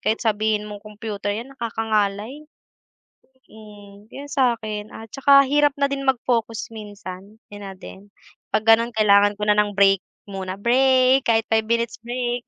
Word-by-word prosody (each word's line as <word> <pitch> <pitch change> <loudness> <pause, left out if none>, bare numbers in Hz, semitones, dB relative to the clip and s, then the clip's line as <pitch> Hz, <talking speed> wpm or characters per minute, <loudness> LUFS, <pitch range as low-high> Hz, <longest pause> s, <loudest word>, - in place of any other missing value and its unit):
Kahit 220 +2 -1
sabihin 215 -1 0
mong 205 -1 -9
computer 210 -1 -7
yan, 230 +6 -4
nakakangalay. 225 +3 -2 1.0
Hmm, 205 -1 -15
yun 285 +1 -9
sa'kin, 220 -5 -1
at 225 -1 -10
saka 275 0 +5
hirap 290 +1 +2
na 280 0 0
din 275 -1 -4
mag-focus 230 -3 -1
minsan, 205 -2 -10 0.2
yun 205 0 -10
na 195 - -8
din. 190 +1 -13 0.5
'Pag 215 - +2
ganun 230 +1 +3
kailangan 205 -1 +4
ko 210 - -11
na 210 0 +2
ng 205 -1 +1
break 195 -1 +4 0.3
muna, 190 -1 -5
break 260 +4 +3
kahit 225 -1 +3
5 220 -1 +2
minutes 235 -1 -1
break. 240 +1 -4
220 Hz, 155 wpm, -22 LUFS, 205-245 Hz, 1.0 s, saka